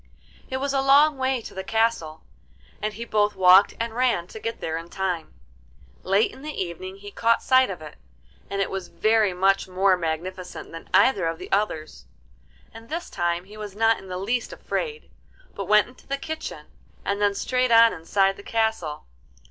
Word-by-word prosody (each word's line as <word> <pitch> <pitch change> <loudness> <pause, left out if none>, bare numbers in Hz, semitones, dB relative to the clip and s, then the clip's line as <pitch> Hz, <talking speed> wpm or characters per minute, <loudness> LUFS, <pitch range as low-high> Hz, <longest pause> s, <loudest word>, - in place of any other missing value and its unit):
It 260 - -2
was 275 +1 -2
a 270 - +2
long 280 +2 +5
way 260 -1 0
to - - -9
the 190 - -5
castle, 220 -8 0 0.6
and 215 0 -2
he 235 - -6
both 210 -2 +1
walked 185 +1 +6
and 230 0 -2
ran 240 -8 +1
to 220 - -9
get 230 +1 -4
there 160 - -3
in 165 +1 -6
time. 185 -4 -3 0.7
Late 195 +3 +2
in - - -13
the 300 +1 -6
evening 185 +1 -5
he 205 +1 -11
caught 230 +3 +2
sight 260 0 +4
of - - -6
it, - - -11 0.5
and 200 0 0
it - - -5
was 190 -2 -4
very 215 -2 +2
much 190 +2 +2
more 185 +1 +3
magnificent 180 +2 -5
than 165 - -10
either 260 -10 +4
of 165 0 -2
the - - -10
others. 160 - -2 0.7
And 225 +1 -12
this 335 +3 -5
time 175 -1 -1
he 205 +3 -14
was 210 -2 -7
not 225 +1 +3
in 195 - -13
the 180 0 -5
least 230 +6 -2
afraid, 455 -2 -4 0.4
but 200 - -5
went 210 +2 +4
into 250 - -18
the 275 - -1
kitchen, 315 +3 -6 0.4
and 200 +1 -1
then 205 -1 +2
straight 255 +4 0
on 230 0 +7
inside 195 +4 +1
the - - -10
castle. 220 -9 -1
205 Hz, 190 wpm, -24 LUFS, 185-230 Hz, 0.7 s, on